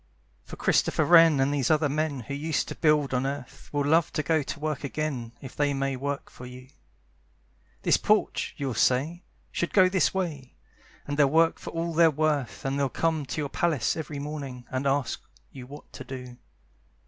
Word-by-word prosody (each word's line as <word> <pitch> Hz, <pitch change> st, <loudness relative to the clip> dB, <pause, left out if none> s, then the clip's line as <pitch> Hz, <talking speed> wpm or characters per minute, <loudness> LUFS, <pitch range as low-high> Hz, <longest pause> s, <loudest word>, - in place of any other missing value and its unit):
For -, -, -10 dB
Christopher -, -, +2 dB
Wren 165 Hz, -4 st, +7 dB
and 135 Hz, +2 st, +2 dB
these 135 Hz, -4 st, 0 dB
other 155 Hz, -1 st, +3 dB
men 145 Hz, -1 st, -1 dB
Who 120 Hz, -, -7 dB
used 155 Hz, +2 st, -1 dB
to -, -, -5 dB
build 150 Hz, -4 st, +2 dB
on 125 Hz, 0 st, +1 dB
earth 140 Hz, -2 st, -7 dB
Will 145 Hz, -1 st, 0 dB
love 160 Hz, +2 st, +3 dB
to 155 Hz, -, -1 dB
go 160 Hz, +2 st, +2 dB
to 145 Hz, +1 st, -6 dB
work 150 Hz, -2 st, -3 dB
again 140 Hz, -5 st, -3 dB
If 130 Hz, -, -9 dB
they 145 Hz, -1 st, +1 dB
may 135 Hz, 0 st, -1 dB
work 140 Hz, +2 st, -4 dB
for 125 Hz, -, -10 dB
you. 125 Hz, +1 st, -12 dB, 1.1 s
"This -, -, +4 dB
porch," -, -, +1 dB
you'll 135 Hz, -3 st, -2 dB
say, 145 Hz, +10 st, +1 dB, 0.3 s
"should 170 Hz, -, -2 dB
go 190 Hz, -2 st, +6 dB
this 185 Hz, -3 st, +2 dB
way!" 155 Hz, -9 st, -4 dB, 0.5 s
And 145 Hz, -, -4 dB
they'll 145 Hz, -2 st, +5 dB
work 165 Hz, +2 st, +3 dB
for -, -, -7 dB
all 165 Hz, 0 st, -3 dB
they're 165 Hz, 0 st, +6 dB
worth, 150 Hz, -4 st, -1 dB
And 135 Hz, +1 st, -1 dB
they'll 140 Hz, -1 st, +1 dB
come 160 Hz, 0 st, -1 dB
to 150 Hz, -, -3 dB
your 145 Hz, -, -3 dB
palace 150 Hz, -7 st, 0 dB
every 155 Hz, -2 st, -5 dB
morning, 140 Hz, -4 st, -6 dB
And 130 Hz, +2 st, -1 dB
ask 140 Hz, -1 st, 0 dB, 0.3 s
you 125 Hz, -2 st, -10 dB
what 145 Hz, +2 st, -12 dB
to -, -, -8 dB
do. 125 Hz, -2 st, -8 dB
145 Hz, 195 wpm, -27 LUFS, 135-155 Hz, 1.1 s, Wren